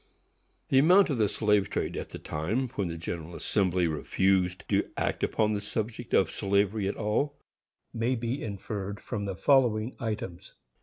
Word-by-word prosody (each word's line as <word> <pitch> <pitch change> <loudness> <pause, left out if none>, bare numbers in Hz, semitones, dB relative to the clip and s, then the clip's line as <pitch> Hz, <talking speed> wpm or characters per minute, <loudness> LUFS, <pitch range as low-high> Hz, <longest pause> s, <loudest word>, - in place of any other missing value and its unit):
The 135 - +5
amount 180 +4 +6
of 130 - -1
the 105 -2 +3
slave 105 -3 +2
trade - - -2
at - - -5
the - - -7
time 110 +13 -2
when 105 -7 -2
the 85 0 -4
General 85 0 -5
Assembly 90 -1 +1
refused 90 +3 +1
to - - +1
act - - -1
upon 110 -1 +1
the 100 - -1
subject 110 +3 -4
of 90 -4 +3
slavery 100 0 +1
at 100 - -2
all, 115 +7 0 0.6
may 115 +3 0
be 120 +3 -3
inferred 100 -1 -5
from 100 -1 -4
the 95 -2 -3
following 120 -1 +3
items. 105 -6 -5
105 Hz, 165 wpm, -28 LUFS, 95-115 Hz, 0.6 s, amount